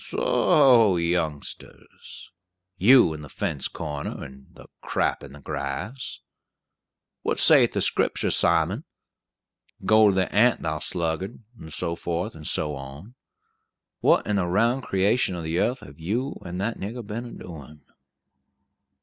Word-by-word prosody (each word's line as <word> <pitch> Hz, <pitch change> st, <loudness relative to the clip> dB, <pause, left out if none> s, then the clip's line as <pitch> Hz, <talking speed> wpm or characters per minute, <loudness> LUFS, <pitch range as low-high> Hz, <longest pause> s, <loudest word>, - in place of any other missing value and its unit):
"Soho, 120 Hz, -9 st, +4 dB
youngsters! 85 Hz, -4 st, -4 dB, 0.4 s
you 105 Hz, -2 st, +6 dB
in 75 Hz, -, -8 dB
the 75 Hz, -, -10 dB
fence 85 Hz, -9 st, -2 dB
corner, 75 Hz, -3 st, -6 dB
and 65 Hz, 0 st, -12 dB
the -, -, -14 dB, 0.2 s
crap -, -, -1 dB
in 70 Hz, -, -11 dB
the 75 Hz, -, -12 dB
grass. 110 Hz, -, -5 dB, 1.0 s
What -, -, -1 dB
saith -, -, +6 dB
the -, -, 0 dB
Scriptur', -, -, +1 dB
Simon? -, -, +2 dB, 1.0 s
'Go 110 Hz, -1 st, +6 dB
to 95 Hz, -, +1 dB
the 95 Hz, -1 st, 0 dB
ant, 115 Hz, +4 st, +3 dB
thou 80 Hz, -1 st, -2 dB
sluggard,' 85 Hz, +7 st, -3 dB
and 80 Hz, -8 st, -11 dB
so 85 Hz, +3 st, -3 dB
forth 85 Hz, +6 st, -3 dB
and 75 Hz, -1 st, -9 dB
so 75 Hz, -1 st, -1 dB
on. 70 Hz, -, -9 dB, 0.9 s
What -, -, +3 dB
in 105 Hz, -1 st, 0 dB
the 90 Hz, -3 st, 0 dB
round 115 Hz, +8 st, +2 dB
creation 100 Hz, -1 st, +1 dB
of 85 Hz, -, -5 dB
the 80 Hz, -, -4 dB
yearth 120 Hz, +10 st, 0 dB
have 70 Hz, +2 st, -13 dB
you 115 Hz, -, -3 dB
and 90 Hz, 0 st, -6 dB
that 115 Hz, +4 st, -2 dB
nigger 115 Hz, +4 st, -6 dB
been 110 Hz, +4 st, -5 dB
a 120 Hz, -, -9 dB
doin'?" 75 Hz, -3 st, -11 dB
90 Hz, 145 wpm, -25 LUFS, 80-110 Hz, 1.0 s, you